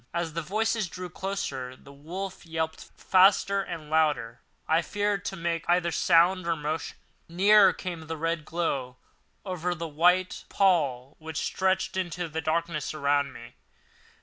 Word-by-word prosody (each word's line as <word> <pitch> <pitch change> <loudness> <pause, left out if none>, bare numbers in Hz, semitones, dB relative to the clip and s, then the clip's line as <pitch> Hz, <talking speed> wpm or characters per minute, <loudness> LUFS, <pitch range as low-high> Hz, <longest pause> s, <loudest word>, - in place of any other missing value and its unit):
As 170 -2 -2
the 165 - -2
voices 215 +4 0
drew 180 0 -7
closer, 140 -11 -4
the 140 +2 -16
wolf 180 +7 -7
yelped 160 -1 -4
faster 195 +1 +4
and 165 -5 -7
louder. 150 -7 +1 0.3
I 160 +1 +3
feared 205 +1 -1
to 190 - -3
make 165 -2 -2
either 175 -1 +3
sound 175 +3 +3
or 170 - +2
motion. 155 +1 -4 0.3
Nearer 195 +3 +6
came 170 -3 -6
the 160 0 -4
red 165 0 -1
glow, 140 -7 -2 0.5
over 180 -2 -2
the 165 0 -5
white 180 +4 +2
pall 145 -9 +1
which 160 -1 -7
stretched 190 +1 0
into 175 -1 -2
the 160 +1 -4
darkness 160 -1 -2
around 145 -1 +1
me. 115 0 -12
170 Hz, 150 wpm, -27 LUFS, 155-185 Hz, 0.5 s, Nearer